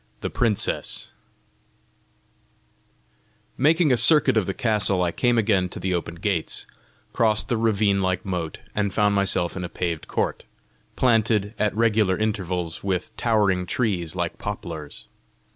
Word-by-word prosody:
THE - - -3
PRINCESS 115 -4 -1 2.4
Making 155 +2 +3
a 125 - +4
circuit 150 +1 +5
of 110 -4 +1
the 95 - -1
castle, 105 -5 +1
I 85 - 0
came 120 +6 +1
again 100 -5 +2
to - - -8
the 95 0 -1
open 85 -1 -3
gates, 85 -1 -2 0.5
crossed 110 0 +2
the 120 - +1
ravine 105 -3 +2
like 95 -1 -1
moat, 90 -4 -4
and 100 -1 0
found 105 0 +2
myself 95 -3 0
in 95 - -4
a 90 - -4
paved 85 -2 -3
court, - - -2 0.5
planted 110 -4 +2
at 105 -1 0
regular 110 -5 +2
intervals 90 -6 -2
with 95 -2 -2
towering 100 -6 +1
trees 90 -6 -1
like 85 -2 -3
poplars. 85 -8 -6
100 Hz, 140 wpm, -24 LUFS, 90-110 Hz, 2.4 s, circuit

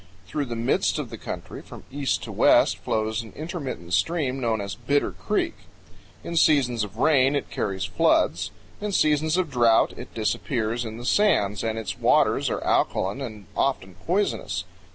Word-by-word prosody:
Through 145 +9 -2
the 120 -2 -5
midst 115 +1 +1
of - - -4
the - - -6
country, - - -7
from - - -12
east 140 0 -1
to - - -6
west, - - +4
flows 110 +1 -1
an 115 - -12
intermittent 140 - -5
stream 140 - +1
known 115 -3 0
as 100 -1 -4
Bitter 140 +7 0
Creek. - - -1 0.7
In 170 - -5
seasons 135 -8 +3
of 100 -3 -8
rain 135 -2 +4
it 145 - -3
carries 95 -2 -2
floods; 90 -2 +2 0.3
in 210 -1 -3
seasons 155 0 +2
of 180 -5 0
drought 120 -3 +4
it - - -9
disappears 115 +1 -1
in 110 0 -6
the 120 - -8
sands, 105 - +2
and 110 -1 -1
its 95 -5 -5
waters - - +3
are - - -3
alkaline 100 +9 0
and 110 -6 -7
often 110 -9 -1
poisonous. 195 +4 0
120 Hz, 170 wpm, -25 LUFS, 110-145 Hz, 0.7 s, west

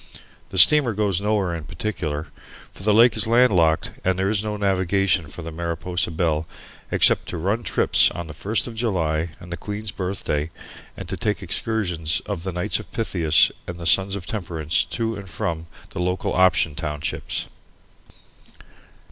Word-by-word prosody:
The 95 - -6
steamer 120 - +8
goes 100 -3 0
nowhere 100 -4 0
in 80 -3 -7
particular, 80 -3 -4 0.5
for - - -13
the 105 +2 +2
lake 115 +3 +5
is - - +3
landlocked 100 -10 +3
and 95 0 +1
there 95 +2 0
is 105 -1 0
no 105 -1 -3
navigation 95 -3 +1
for 80 +4 -10
the 80 - -6
Mariposa 85 +2 -2
Belle 80 -1 -1 0.4
except - - +4
to - - -5
"run 100 +8 -1
trips" - - +3
on 85 - -6
the 75 - -9
first 105 +8 0
of 120 - -7
July 85 -8 -1
and 90 - -12
the 85 - -4
Queen's 105 0 -5
Birthday, 90 -6 -3 0.5
and 95 - -7
to 95 +1 -4
take 105 -4 -2
excursions 90 -5 -1
of 100 -5 -4
the 95 +2 -4
Knights 90 0 -1
of - - -11
Pythias 85 -8 +3 0.2
and 85 - -6
the 85 - -8
Sons 95 +3 +4
of 95 -3 -6
Temperance 85 -6 -1
to 115 -1 -3
and 100 -2 -9
from 85 -1 -4 0.2
the - - -6
Local 90 +1 -1
Option 90 -4 +3
Townships. 75 -1 -3
90 Hz, 170 wpm, -22 LUFS, 80-105 Hz, 0.5 s, steamer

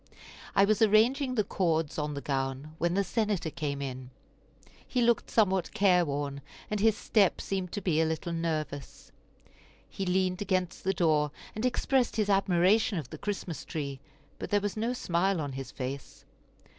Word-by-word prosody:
I 195 0 +6
was 215 +2 +1
arranging 245 +5 +4
the 215 - +3
cords 165 -6 0
on 150 -1 -2
the 140 - -4
gown 135 +2 -3
when 170 +2 +1
the 200 - +3
Senator 205 -4 -1
came 140 -2 -3
in; 130 -1 -6 0.8
he 250 - -1
looked 235 -1 +2
somewhat 190 -5 +1
careworn, 145 -8 +2 0.3
and 210 - 0
his 220 0 +3
step 205 -4 +2
seemed 190 -2 -3
to 205 - -3
be 160 -4 +2
a - - +3
little 160 +2 -2
nervous. 155 -4 -4 0.8
He 195 - -5
leaned 185 +1 +1
against 185 -3 -1
the 190 - +1
door, 155 -4 +2 0.2
and 220 +4 0
expressed 250 0 +1
his 210 -2 +1
admiration 195 +2 +3
of 150 -6 -5
the - - -8
Christmas 195 -5 -4
tree, 140 -5 -4 0.4
but - - -5
there 205 - +3
was 205 -2 -3
no 230 +3 -1
smile 185 -5 0
on 145 -2 -3
his 135 -1 -6
face. 135 +1 -6
180 Hz, 170 wpm, -29 LUFS, 150-205 Hz, 0.8 s, I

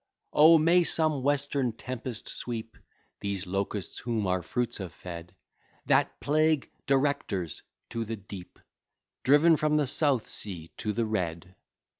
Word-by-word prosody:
Oh! 160 +2 +8
may 170 +3 +5
some 155 -4 +1
western 140 -3 +1
tempest 125 -1 -5
sweep 115 -2 -5 0.4
These 100 -1 -2
locusts 100 +1 -3
whom 115 -3 -1
our 90 -1 +1
fruits 120 +4 -2
have 95 -3 -6
fed, 85 0 -9 0.5
That - - +2
plague, 155 0 +2 0.2
directors, 135 - 0 0.3
to 115 - -2
the 115 +1 -4
deep, 100 -3 -10 0.6
Driven 150 +5 +5
from 150 0 +2
the 150 - +2
South 135 -2 +1
Sea 85 -6 -6
to 105 - -2
the 115 +2 0
Red! 90 -4 -3
115 Hz, 135 wpm, -29 LUFS, 100-145 Hz, 0.6 s, Oh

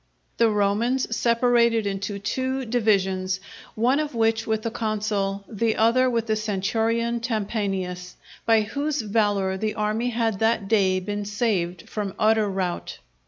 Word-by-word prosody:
The 230 -1 +4
Romans 220 +4 +1
separated 235 -1 +3
into 200 +1 -3
two 260 +6 -2
divisions, 190 -5 +1 0.4
one 250 +6 +2
of 300 -4 -3
which 225 0 +1
with 220 -1 0
the 230 - -2
consul, 205 -3 -2
the 225 0 0
other 245 +3 +3
with 230 -2 0
the 220 -1 0
centurion 225 +3 0
Tempanius 195 -6 -3 0.3
by 225 -1 +4
whose 285 +6 -2
valour 205 -3 +1
the 215 +2 -2
army 215 +3 0
had 225 -4 -1
that 220 -2 +1
day 195 -3 +3
been 205 +2 -4
saved 200 -5 -1
from 205 -3 -4
utter 215 -1 +3
rout. 185 -2 -3
215 Hz, 140 wpm, -24 LUFS, 200-230 Hz, 0.4 s, The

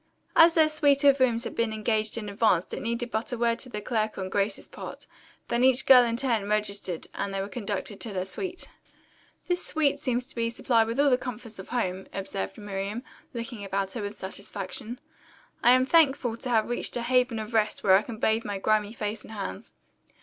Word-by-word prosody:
As 330 0 +7
their 315 -2 +6
suite 290 -2 +2
of 280 -1 +6
rooms 240 -2 +2
had - - -5
been 230 -1 0
engaged 215 0 0
in 215 -2 -4
advance 200 -4 +2
it - - -4
needed 235 +1 -2
but 220 +5 -2
a 245 - -2
word 230 0 +1
to 255 - -7
the 210 -3 -5
clerk 215 0 -1
on 190 -1 -4
Grace's 200 +1 -1
part, - - -8 0.4
then 240 +1 +1
each 260 0 +4
girl 255 -2 +9
in 230 -1 -1
turn 230 -6 0
registered 200 -5 -1
and 200 - -3
they 195 - -2
were 195 - -2
conducted 205 -2 -4
to 225 - -3
their 185 -2 -2
suite. 360 - -5 0.8
"This 355 0 -1
suite 305 -3 +1
seems 250 -4 -1
to - - -15
be 230 -1 -1
supplied 230 -1 +2
with 230 +4 -3
all 285 -1 +5
the 250 - +3
comforts 230 -4 -7
of 190 - -9
home," 190 -6 -2
observed 95 - -4
Miriam, 205 +3 -4 0.3
looking 230 -2 -5
about 195 0 -2
her 225 - -4
with 205 0 -5
satisfaction. 200 +4 -6 0.6
"I - - +5
am 255 0 +4
thankful 270 -6 +3
to 250 - -5
have 220 -3 +2
reached 240 - -2
a 240 - -2
haven 250 -1 +2
of 220 +1 -6
rest 215 -1 +1
where 190 -1 +6
I 195 - +5
can 225 0 -8
bathe 220 +1 +1
my 205 -1 -3
grimy 215 +1 +1
face 215 -1 -4
and 220 - -11
hands." 200 +1 -6
225 Hz, 215 wpm, -27 LUFS, 205-250 Hz, 0.8 s, girl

